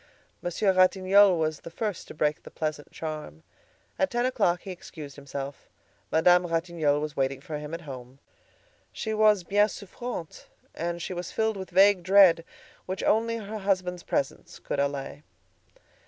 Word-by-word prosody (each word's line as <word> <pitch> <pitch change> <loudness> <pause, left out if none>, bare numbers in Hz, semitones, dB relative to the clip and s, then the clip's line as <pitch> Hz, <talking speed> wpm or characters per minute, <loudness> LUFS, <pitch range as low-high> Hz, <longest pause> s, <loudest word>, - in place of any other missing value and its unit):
Monsieur 190 +3 +1
Ratignolle 185 +1 +5
was 155 -1 -1
the - - -9
first 210 +2 -4
to - - -10
break 150 0 0
the - - -11
pleasant 155 -2 -4
charm. 155 - -6 0.6
At 190 - +2
ten 240 +1 0
o'clock 210 -9 +1
he 195 - -6
excused 155 -5 -10
himself. 140 0 -7 0.4
Madame 175 +2 +5
Ratignolle 165 -3 0
was 150 0 -4
waiting 135 0 0
for 150 +2 -6
him 150 0 -7
at 170 - -8
home. 130 -4 -9 0.7
She 220 - -4
was 215 -3 +4
bien 205 +3 +3
souffrante, 205 -3 -7 0.3
and 170 0 -3
she - - -4
was 175 -1 -5
filled 220 -1 0
with 190 -2 -7
vague 195 +1 +5
dread, 185 -2 +6 0.4
which 185 +1 -3
only 230 +1 +2
her 215 0 -6
husband's 185 -3 -1
presence 140 -4 -3
could - - -4
allay. 140 0 -2
175 Hz, 155 wpm, -27 LUFS, 150-200 Hz, 0.7 s, dread